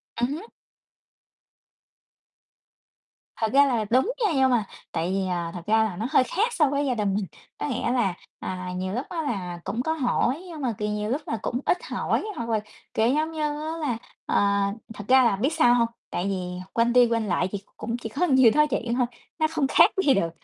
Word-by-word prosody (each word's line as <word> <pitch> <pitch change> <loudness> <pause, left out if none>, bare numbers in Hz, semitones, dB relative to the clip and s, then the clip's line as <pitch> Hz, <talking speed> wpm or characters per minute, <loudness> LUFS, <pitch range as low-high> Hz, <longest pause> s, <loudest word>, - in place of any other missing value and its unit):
Ừm 240 +1 +1
hứm. 350 +8 -6 2.9
Thật 220 -1 -1
ra 280 +1 +7
là 235 -5 0
đúng 260 - +3
nha, 405 - +2
nhưng 265 -1 +4
mà 240 -4 +3 0.3
tại 170 +3 -1
vì, 190 0 0
à, 175 -2 -2
thật 175 - -6
ra 220 +1 +4
là 215 -5 -2
nó 225 - -2
hơi - - +5
khác 440 - 0
so 305 -5 +3
với 285 +1 0
gia 255 -3 0
đình 205 -3 0
mình. 205 -1 -1 0.3
Có - - -3
nghĩa 245 -3 -1
là, 235 -7 +1 0.3
à, 185 -1 -5
nhiều 185 +1 -3
lúc 250 +5 -2
á, 340 -2 -2
là 185 - -3
cũng 210 +5 -2
có 320 - 0
hỏi 270 0 0
nhưng 325 -4 -8
mà, 250 -4 0
kiểu, 210 0 -2
nhiều 210 0 -2
lúc 275 +6 -1
là 225 - -2
cũng 245 - -2
ít - - +3
hỏi. - - -1
Hoặc 235 0 -4
là 220 - +2 0.3
kiểu 220 - +2
giống 305 +5 +1
như 315 -1 -4
á, 300 +2 -2
là, 255 -7 -1 0.3
ờ - - -1 0.6
thật 205 -1 -8
ra 260 0 +6
là 230 -5 +3
biết 265 +10 0
sao 275 -7 +5
hông? 235 -1 +3 0.2
Tại 175 - -2
vì 180 -2 -3
quanh 235 +1 +2
đi 245 -1 +6
quanh 230 -2 0
lại 180 -1 +1
thì 205 - -3 0.2
cũng 235 +1 -3
chỉ 230 -2 -6
có 280 +11 0
nhiêu 260 -7 +6
đó 300 0 +6
chuyện 235 -3 -1
thôi, 250 0 +2 0.3
nó 315 - +3
không 310 -4 +1
khác - - +6
gì 275 - +6
được, 170 -7 +1
240 Hz, 225 wpm, -25 LUFS, 210-285 Hz, 2.9 s, ra